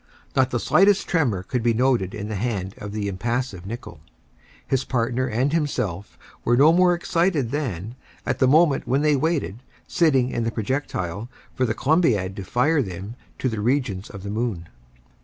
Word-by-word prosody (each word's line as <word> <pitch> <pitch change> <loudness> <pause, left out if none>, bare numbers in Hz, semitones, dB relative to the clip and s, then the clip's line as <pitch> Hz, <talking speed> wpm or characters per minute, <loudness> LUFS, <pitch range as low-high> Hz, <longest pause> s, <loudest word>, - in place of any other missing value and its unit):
Not 130 -1 +3
the 120 - -1
slightest 195 - +3
tremor 125 - +1
could 125 +6 -2
be 115 0 +2
noted 120 -6 +1
in 105 -1 -5
the 110 - -4
hand 100 -3 -2
of 100 -1 -6
the 105 -1 -3
impassive 100 -1 -3
Nicholl. 115 -7 -7 0.7
His 135 -1 0
partner 125 +1 0
and 130 +5 0
himself 105 - -2 0.3
were 120 +1 +3
no 150 +5 +6
more 180 0 +4
excited 170 -7 0
than, 115 - -3 0.3
at - - -1
the 130 - +4
moment 150 0 +4
when 135 +4 +1
they 150 -1 +4
waited, 140 - -1 0.3
sitting 135 -7 +3
in 120 - -1
the 115 - 0
projectile, 110 -4 -3 0.2
for 130 - 0
the 110 - -1
Columbiad 125 - +2
to 100 - -4
fire 145 - +2
them 95 +1 -6 0.2
to - - -1
the 110 -4 -2
regions 120 -5 -1
of 100 -2 -9
the 100 - -4
moon. 105 -7 -3
120 Hz, 175 wpm, -23 LUFS, 100-140 Hz, 0.7 s, no